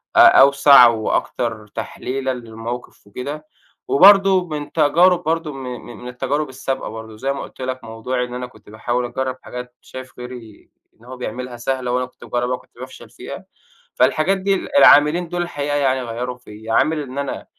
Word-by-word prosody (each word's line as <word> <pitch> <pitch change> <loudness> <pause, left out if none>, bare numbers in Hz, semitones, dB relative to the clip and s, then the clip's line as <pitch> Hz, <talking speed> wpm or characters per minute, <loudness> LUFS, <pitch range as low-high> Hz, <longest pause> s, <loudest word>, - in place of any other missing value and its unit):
أ - - +5
أوسع 140 -2 +8
وأكتر 110 0 -2
تحليلًا 130 +5 -4
للموقف 115 -1 -8
وكده، 145 +8 -7 0.4
وبرضه 195 +2 +6
من 150 -2 -6
تجارب 170 +4 +3
برضه 165 -1 -2
م 135 -1 -8
م 125 -2 -8
من 125 - -8
التجارب 135 +4 -2
السابقة 130 0 -4
برضه 110 -1 -9
زي 135 +4 -2
ما 140 - -6
قُلت - - -12
لك 130 0 -4
موضوعي 120 +3 -3
إن 125 - -10
أنا 125 0 -5
كنت 125 - -19
باحاول 120 +3 -2
أجرّب 130 +1 -3
حاجات 125 0 -8
شايف 130 -1 -11
غيري 125 -4 -11 0.3
إن 120 - -20
هو 130 0 -9
بيعملها 125 +1 -6
سهلة 125 +1 -2
وأنا 125 +1 0
كنت 125 - -18
باجرّبها 125 +1 -1
وكنت - - -18
بافشل 130 +1 -11
فيها، - - -9 0.5
فالحاجات 190 +5 +2
دي 195 +1 0
ال 280 - -3
العاملين 160 - +6
دول 175 0 -2
الحقيقة 145 -4 -3
يعني 130 -2 +1
غيّروا 125 +1 -5
فيّا، 110 -1 -8
عامل 155 -1 +2
إن 135 0 -9
أنا 140 -1 -4
130 Hz, 175 wpm, -20 LUFS, 120-145 Hz, 0.5 s, أوسع